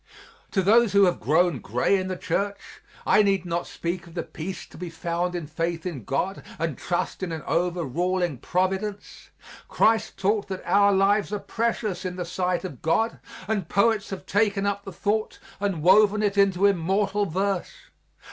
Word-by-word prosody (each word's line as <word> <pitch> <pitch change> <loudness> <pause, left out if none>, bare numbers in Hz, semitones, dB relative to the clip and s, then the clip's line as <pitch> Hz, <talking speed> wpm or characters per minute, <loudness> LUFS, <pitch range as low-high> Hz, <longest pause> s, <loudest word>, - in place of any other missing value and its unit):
To 190 - 0
those 225 +2 +4
who 200 0 +6
have 180 -2 +2
grown 160 +3 +2
gray 125 - +1
in 185 -1 -1
the 185 -1 -3
Church, 200 +3 -3 0.2
I - - +5
need 195 -3 +1
not 170 0 -2
speak 175 +1 -4
of 170 - -14
the 170 - -2
peace 175 +3 -7
to - - -17
be 175 +1 -6
found 170 +1 -2
in 170 -3 -3
faith 165 +2 -3
in 145 - -5
God 185 +8 -2 0.2
and 165 -3 -2
trust 175 +6 -3
in 185 -3 -3
an 160 -1 -5
overruling 175 -1 -1
Providence. 190 - -2 0.4
Christ 220 0 +2
taught 200 +2 0
that 190 -1 -6
our 200 0 +4
lives 200 +1 +2
are 210 - -1
precious 220 -3 -2
in 180 -1 -4
the 180 -1 -4
sight 180 +1 -1
of 150 -10 -7
God, 220 +8 +1 0.3
and 200 -6 -2
poets 210 +1 +2
have 195 - -6
taken 205 -1 +1
up 200 0 -2
the 195 - -6
thought 215 +4 -1 0.2
and 195 -6 -2
woven 210 +3 +5
it 205 -1 +1
into 195 -1 +3
immortal 200 +2 +1
verse. 190 +2 -3
190 Hz, 175 wpm, -25 LUFS, 175-200 Hz, 0.4 s, who